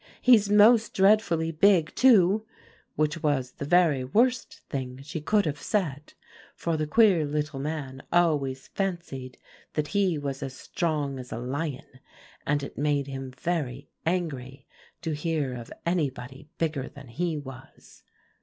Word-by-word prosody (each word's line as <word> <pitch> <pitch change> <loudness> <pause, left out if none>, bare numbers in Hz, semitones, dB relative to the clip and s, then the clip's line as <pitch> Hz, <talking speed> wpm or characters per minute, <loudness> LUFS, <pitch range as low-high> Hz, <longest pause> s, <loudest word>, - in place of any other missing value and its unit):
'He's 220 -5 +5
most 215 +2 +5
dreadfully 190 -5 +3
big 165 0 +3
too,' 215 -5 +5 0.5
which 155 +1 0
was 140 -5 0
the 140 - -6
very 160 -4 +3
worst 235 - +1
thing 130 -2 -5
she 150 +2 -5
could 205 +6 +2
have 150 -2 -3
said; 150 -9 -2 0.4
for 165 -1 -1
the 155 -1 -1
queer 195 -2 +5
little 150 -1 -2
man 140 -2 -4
always 150 -7 +1
fancied 170 -10 -4 0.4
that 150 -1 -1
he 195 -5 +1
was 140 -1 -4
as 135 -2 -5
strong 150 -5 -2
as 125 0 -9
a - - -4
lion, 130 +1 -5 0.5
and 145 0 +1
it 140 - -7
made 145 -1 +1
him 135 -1 -6
very 140 -2 -3
angry 140 -6 -3 0.4
to 165 - -2
hear 150 -3 -1
of 120 -2 -8
anybody 145 -4 -2
bigger 155 -5 -2
than 140 -1 -13
he 160 +7 -2
was. 135 -2 -12
150 Hz, 145 wpm, -27 LUFS, 135-175 Hz, 0.5 s, He's